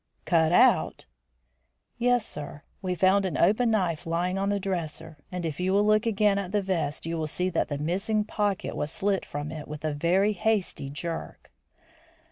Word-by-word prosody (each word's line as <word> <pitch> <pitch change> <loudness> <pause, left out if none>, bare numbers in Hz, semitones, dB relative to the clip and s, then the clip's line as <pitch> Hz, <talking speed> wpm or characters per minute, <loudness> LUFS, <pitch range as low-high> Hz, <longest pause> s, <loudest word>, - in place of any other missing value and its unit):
"Cut 160 -2 +3
out!" - - +4 0.9
"Yes, 245 -2 +2
sir; 145 0 -7 0.2
we 185 -2 -1
found 190 +3 +4
an 180 -6 -2
open 215 +7 +3
knife 180 -6 0
lying 175 +3 0
on 195 +1 0
the 205 0 +1
dresser, 160 -4 -4
and 180 -2 -4
if 155 -1 -4
you 185 +1 +1
will 205 +1 +4
look 215 +2 +3
again 205 -2 +3
at 190 -2 -5
the 205 0 +1
vest 165 -7 -2
you 165 0 -2
will 155 - -1
see 180 +4 -1
that 165 - 0
the 145 - -3
missing 195 +8 0
pocket 205 -2 -2
was 150 - -2
slit 195 +1 0
from 145 +1 -5
it 155 -2 -7
with 150 +1 -7
a 155 - 0
very 185 +8 +2
hasty 200 -8 -1
jerk." 165 +3 -6
180 Hz, 185 wpm, -27 LUFS, 160-200 Hz, 0.9 s, out